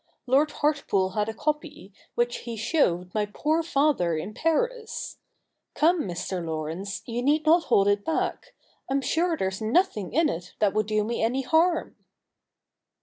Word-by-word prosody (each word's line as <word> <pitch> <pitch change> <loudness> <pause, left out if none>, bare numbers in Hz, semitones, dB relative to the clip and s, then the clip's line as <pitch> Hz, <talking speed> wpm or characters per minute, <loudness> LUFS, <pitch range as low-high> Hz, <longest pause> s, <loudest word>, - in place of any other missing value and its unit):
Lord 275 +4 +3
Heartpool 280 -12 0
had 210 +1 0
a - - -3
copy, 295 -7 -3 0.2
which 240 0 0
he 235 -2 -7
showed 180 - +1
my 210 -1 0
poor 310 +8 +1
father 275 - +1
in 185 +7 -5
Paris. 450 - -2 0.6
Come, 330 -1 +3
Mr. 175 0 -4
Laurence, 165 +5 -4
you 240 0 -3
need 300 +4 +2
not 330 +2 +5
hold 200 0 +3
it 205 0 +2
back. 320 - -2 0.3
I'm 275 +1 +1
sure 330 +4 +1
there's 190 -3 -2
nothing 220 - +1
in 320 +3 +3
it 180 - -5
that 205 -2 +2
would 215 0 0
do 215 -1 +1
me 235 +3 -2
any 250 +4 +1
harm.' 325 +4 +2
240 Hz, 155 wpm, -26 LUFS, 200-310 Hz, 0.6 s, not